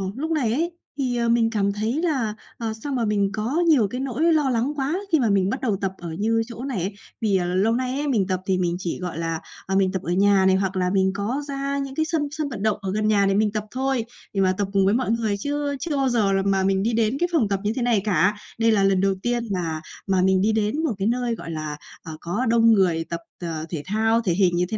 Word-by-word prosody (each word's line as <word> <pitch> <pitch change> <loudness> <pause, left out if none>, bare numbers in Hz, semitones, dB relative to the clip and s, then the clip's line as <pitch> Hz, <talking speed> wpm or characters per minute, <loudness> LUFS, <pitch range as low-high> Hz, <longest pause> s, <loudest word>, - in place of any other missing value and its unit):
lúc 315 +4 -3
này 250 -8 +1
ấy, 335 +6 0 0.3
thì, 255 -3 -1
ờ, 235 -1 +1
mình 230 -1 +3
cảm 200 -3 0
thấy 225 +8 -1
là, 260 -10 0 0.2
ờ, 225 -2 -3
sao 285 - -3
mà 240 -3 0
mình 200 -2 +1
có 230 +9 -1
nhiều 265 -11 +5
cái 250 +5 -5
nỗi 275 +6 +1
lo 300 -4 +2
lắng 250 +3 0
quá, 285 +4 -1 0.2
khi 320 - +4
mà 235 -5 +2
mình 195 -1 +2
bắt 260 - -3
đầu 225 -6 +1
tập 195 -1 0
ở 170 -2 -7
như 225 +2 +2
chỗ 235 0 -8
này 260 -9 -2
ấy. 195 - -3 0.3
Vì, 200 -3 +2
à, 180 - -1
lâu 190 +5 +2
nay 255 +1 -1
ấy 295 - -1
mình 220 -9 +1
tập 185 -1 -1
thì 190 -1 +1
mình 175 -1 0
chỉ 180 -1 -3
gọi 180 -3 -5
là, 165 -1 -2 0.3
ờ, 190 - -1
mình 190 -1 +3
tập 190 -2 -2
ở 175 - -3
nhà 195 +1 +4
này, 190 0 +5
hoặc 190 0 -1
là 180 -1 +1
mình 190 0 +2
có 220 +8 -2
ra 275 0 -2
những 275 -1 -4
cái 315 - +1
sân 315 -3 -1
sân 305 -1 -3
vận 220 -5 -5
động 215 -1 +2
ở 190 -1 -3
gần 215 +2 0
nhà 205 -2 +3
để 195 - +2
mình 210 0 +2
tập 215 -1 -3
thôi, 260 -2 -1 0.3
để 195 - +1
mà 185 -1 +3
tập 205 -2 0
cùng 195 -1 +3
với 200 - +3
mọi 245 -1 +1
người. 225 -3 0
Chứ 285 +4 -2
chưa 315 -2 -2
bao 270 -1 +2
giờ 220 -5 +2
là 195 - +2
mà 195 -1 +2
mình 190 0 +1
đi 230 +2 0
đến 225 +3 +1
cái 350 - +1
phòng 260 -12 +2
tập 195 -1 0
như 210 - +1
thế 255 - -2
này 235 -4 +2
cả, 205 0 +3 0.2
đây 225 0 +4
là 205 -3 +3
lần 195 -1 +3
đầu 195 0 +2
tiên 240 -1 0
mà 165 -4 -2 0.3
mà 190 -1 +2
mình 190 0 +3
đi 210 +3 +3
đến 220 +8 0
một 305 -7 +1
cái 195 +1 0
nơi, 240 0 0
gọi 165 - -7
là, 155 -2 -4 0.3
ờ, 160 -2 -8
có 205 +9 -2
đông 230 0 +5
người 180 -5 +2
tập, 170 - -3 0.2
ờ, 160 -2 -4
thể 155 -4 -4
thao 225 +3 +2
thể 190 -7 0
hình 180 -1 +2
như 175 +1 +2
thế 220 - -2
215 Hz, 285 wpm, -23 LUFS, 190-250 Hz, 0.3 s, nhiều